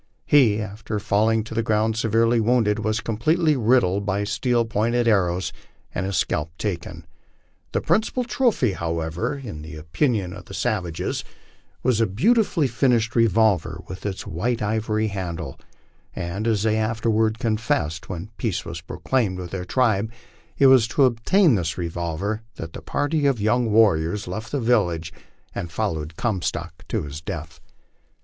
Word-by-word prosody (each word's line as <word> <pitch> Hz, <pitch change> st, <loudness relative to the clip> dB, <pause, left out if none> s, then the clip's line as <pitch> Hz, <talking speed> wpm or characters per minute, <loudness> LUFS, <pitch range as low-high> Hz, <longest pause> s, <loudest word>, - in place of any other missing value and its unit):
He, 120 Hz, -8 st, +5 dB
after 105 Hz, 0 st, -4 dB
falling 105 Hz, +2 st, +2 dB
to 110 Hz, -, -8 dB
the 115 Hz, -, +1 dB
ground 110 Hz, 0 st, +1 dB
severely 115 Hz, +1 st, +2 dB
wounded, 110 Hz, -2 st, +2 dB
was 110 Hz, +1 st, -1 dB
completely 155 Hz, +8 st, +1 dB
riddled 110 Hz, -5 st, +3 dB
by 100 Hz, 0 st, 0 dB
steel 120 Hz, +3 st, +1 dB
pointed 115 Hz, +2 st, +1 dB
arrows, 90 Hz, -4 st, +2 dB, 0.4 s
and 90 Hz, +2 st, -2 dB
his 95 Hz, -3 st, -1 dB
scalp 80 Hz, +1 st, -1 dB
taken. 85 Hz, -5 st, -4 dB, 0.7 s
The -, -, 0 dB
principal 230 Hz, +3 st, +1 dB
trophy, 235 Hz, -, +1 dB
however, 85 Hz, -, -2 dB
in 105 Hz, -, -7 dB
the 80 Hz, +1 st, -9 dB
opinion 90 Hz, -, -1 dB
of -, -, -10 dB
the -, -, -9 dB
savages, 95 Hz, -9 st, -2 dB, 0.6 s
was 125 Hz, -3 st, +2 dB
the 115 Hz, -, +3 dB
beautifully 175 Hz, -, +2 dB
finished 120 Hz, -2 st, +1 dB
revolver 105 Hz, -8 st, +2 dB
with 95 Hz, -, -8 dB
its 100 Hz, -2 st, -4 dB
white 110 Hz, +6 st, -1 dB
ivory 110 Hz, 0 st, 0 dB
handle, 85 Hz, -6 st, -5 dB, 0.6 s
and, 95 Hz, +6 st, -3 dB
as 110 Hz, -3 st, +1 dB
they 110 Hz, 0 st, +2 dB
afterward 110 Hz, 0 st, +1 dB
confessed 110 Hz, -, -1 dB
when 90 Hz, +4 st, -6 dB
peace 110 Hz, -7 st, -2 dB
was 85 Hz, -1 st, -6 dB
proclaimed 100 Hz, +3 st, -1 dB
with 90 Hz, -2 st, -6 dB
their 90 Hz, -2 st, -4 dB
tribe, 110 Hz, -1 st, +1 dB, 0.5 s
it 140 Hz, -, +4 dB
was 130 Hz, -4 st, +7 dB
to 140 Hz, -, +2 dB
ob 115 Hz, -3 st, +2 dB
tain 190 Hz, -7 st, +5 dB
this 85 Hz, -6 st, -1 dB
revolver 85 Hz, +5 st, -3 dB
that 80 Hz, 0 st, -7 dB
the -, -, -7 dB
party 145 Hz, 0 st, 0 dB
of 135 Hz, -5 st, +1 dB
young 110 Hz, +2 st, +1 dB
warriors 100 Hz, -3 st, +3 dB
left 110 Hz, +2 st, -5 dB
the 145 Hz, -, 0 dB
village 85 Hz, -10 st, +1 dB, 0.4 s
and 85 Hz, -, -5 dB
followed 80 Hz, -6 st, -2 dB
Comstock 85 Hz, -6 st, -3 dB
to -, -, -1 dB
his 75 Hz, +2 st, -7 dB
death. 80 Hz, -2 st, -6 dB
110 Hz, 155 wpm, -23 LUFS, 90-115 Hz, 0.7 s, was